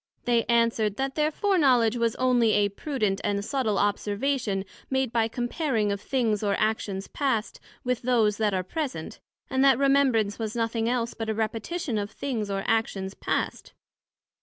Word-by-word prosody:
They 235 -1 +2
answered, 230 -3 +2
That 270 +2 -2
their 305 +1 +1
foreknowledg 275 - +3
was 230 -2 0
onely 245 -4 +3
a 205 -1 +3
prudent 210 -3 -2
and 200 -1 -1
subtile 235 -6 0
Observation 205 +1 0 0.2
made 265 -2 0
by 225 -2 +2
comparing 240 -2 -1
of 200 0 -3
things 225 -6 0
or 200 -2 +1
actions 210 -3 -1
past, 260 -7 -1 0.2
with 250 -1 -1
those 230 -4 +2
that 210 -3 +1
are 185 - 0
present; 220 - -4 0.3
and 265 0 +1
that 270 -1 +6
Remembrance 265 -7 +2
was 220 0 -3
nothing 230 0 0
else 240 -1 -1
but 225 -1 -5
a 220 - 0
Repetition 225 +4 -2
of 205 0 -3
things 225 -4 -3
or 195 0 -2
actions 200 -4 0
past. - - -3
225 Hz, 160 wpm, -26 LUFS, 210-260 Hz, 0.3 s, that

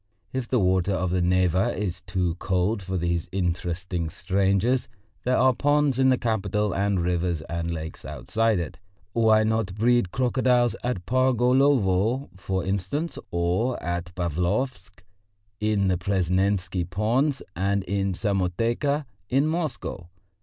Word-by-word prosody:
If 130 -2 -2
the 125 - +1
water 95 -1 +2
of 90 -1 -1
the 90 0 +1
Neva 90 +1 +2
is 95 -3 -3
too 90 -1 -1
cold 95 +3 0
for 95 0 -3
these 85 -1 -1
interesting 90 -1 -2
strangers, 100 +7 +1 0.4
there 125 +1 +2
are 130 0 +4
ponds 145 0 +2
in 130 0 +5
the 130 - +4
capital 105 -4 0
and 100 0 +1
rivers 85 -1 0
and 85 +2 -4
lakes 80 -1 -5
outside 100 - 0
it. 85 - -4 0.3
Why 110 -2 +4
not 110 -4 0
breed 120 -3 +2
crocodiles 125 -2 +2
at 115 -8 -2
Pargolovo, 125 -1 +2
for 95 -1 -3
instance, 100 - -2
or 90 +9 0
at 85 +1 -3
Pavlovsk, 90 - -2 0.6
in 105 -2 +1
the 90 -2 +1
Presnensky 95 0 0
Ponds 115 - 0
and 100 +2 0
in 100 0 -1
Samoteka 115 - 0 0.2
in 135 +3 +3
Moscow? 155 - -3
95 Hz, 130 wpm, -25 LUFS, 90-120 Hz, 0.6 s, in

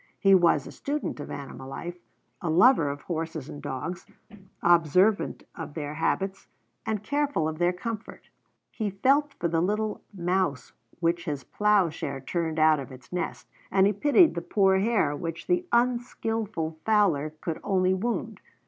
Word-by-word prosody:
He 195 -2 +5
was 170 -6 +4
a - - -8
student 290 - -3
of 145 - -7
animal 135 -1 -7
life, 175 +5 -6 0.4
a 170 - -2
lover 170 - +5
of 145 0 -5
horses 160 -4 -4
and 145 - -8
dogs, 145 +6 -5 0.6
observant 175 +5 +3
of 160 -3 -8
their 150 -2 -4
habits 190 +5 -1 0.4
and 215 -2 -1
careful 285 - 0
of 155 0 -4
their 175 0 +3
comfort. 215 +4 -7 0.4
He 215 -3 -2
felt 275 +9 +2
for 170 - -1
the 165 0 +1
little 210 +4 -1
mouse 180 -6 -1 0.3
which 170 0 +1
his 145 -3 -3
plowshare 180 -9 +1
turned 160 +3 -2
out 155 -1 +5
of 135 -2 -7
its 130 +2 -13
nest, 180 - -3 0.2
and 190 0 +4
he 205 - +3
pitied 295 - +5
the 170 - -3
poor 190 +2 +3
hare 200 -9 +1
which 165 +2 -5
the 360 0 0
unskillful 225 -8 -1
fowler 170 -9 +2
could 165 -2 -4
only 185 -1 +2
wound. 225 +5 -3
180 Hz, 155 wpm, -27 LUFS, 155-210 Hz, 0.6 s, He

